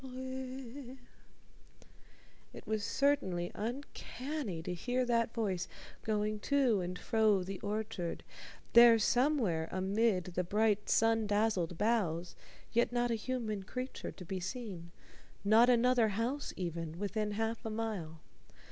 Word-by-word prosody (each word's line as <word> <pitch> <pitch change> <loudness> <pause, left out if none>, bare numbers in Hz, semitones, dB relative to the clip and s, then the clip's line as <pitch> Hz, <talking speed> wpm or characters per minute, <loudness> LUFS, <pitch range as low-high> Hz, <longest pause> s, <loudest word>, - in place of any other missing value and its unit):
"_ 260 0 -7 1.6
It - - -10
was 215 -1 -1
certainly 190 -13 +1
uncanny 250 - -5
to 180 - -3
hear 245 +8 -1
that 230 -2 +1
voice 195 -6 -1 0.4
going 215 0 0
to 255 -5 +2
and 180 +1 -4
fro 215 -3 +2
the 190 0 -6
orchard, 205 -5 -3 0.5
there 235 -1 +9
somewhere 225 - +2
amid 195 +1 +1
the 180 - 0
bright 210 +2 +1
sun 225 -1 +3
dazzled 205 -5 +1
boughs 180 -6 0 0.4
yet 235 +1 +3
not 240 0 +1
a - - +2
human 225 -2 -2
creature 250 +7 -5
to 180 - -11
be 190 +2 -3
seen 185 -3 -6 0.5
not 220 +4 +6
another 245 -1 +4
house 230 +8 -2
even 170 -2 -4
within 210 +2 -2
half 225 +2 -2
a 225 - -3
mile. 210 -8 -4
220 Hz, 125 wpm, -33 LUFS, 185-240 Hz, 1.6 s, there